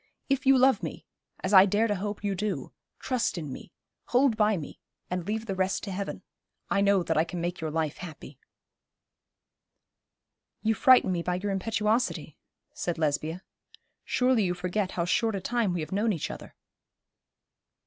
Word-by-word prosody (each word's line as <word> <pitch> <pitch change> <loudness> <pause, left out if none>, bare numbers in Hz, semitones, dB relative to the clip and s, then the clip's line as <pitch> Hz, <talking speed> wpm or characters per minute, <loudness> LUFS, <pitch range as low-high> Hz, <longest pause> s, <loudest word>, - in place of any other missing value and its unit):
If 275 0 0
you 270 0 +7
love 265 +1 +4
me - - -6 0.4
as 190 - -1
I 190 0 +9
dare 205 +3 +2
to 215 - +1
hope 205 +1 -4
you 200 -1 0
do 190 -7 -3 0.2
trust 245 -8 -1
in 150 -5 -5
me, - - -10 0.3
hold 250 -1 +3
by 215 -2 +3
me, 150 - -8 0.3
and 180 0 -2
leave 220 +1 -2
the 200 - -3
rest 190 0 -1
to 200 - -4
Heaven. 195 +1 -4 0.5
I 200 - +3
know 200 -2 +3
that 160 -2 -1
I 160 - +5
can 175 +1 -6
make 175 0 -3
your 160 - -2
life 155 -1 -2
happy.' 150 -5 -10 2.2
'You 225 0 +3
frighten 255 -5 +5
me 175 -2 0
by 180 +1 -1
your 200 +3 -2
impetuosity,' 215 +4 0 0.4
said 175 -1 -3
Lesbia. 155 +3 -1 0.6
'Surely 250 -2 +2
you 180 -1 0
forget 185 +2 -2
how 170 - -1
short 225 +4 +1
a - - -1
time 230 +1 0
we 175 -2 -2
have 155 - -6
known 210 +3 +1
each 165 - -3
other.' - - -10
195 Hz, 175 wpm, -28 LUFS, 175-220 Hz, 2.2 s, I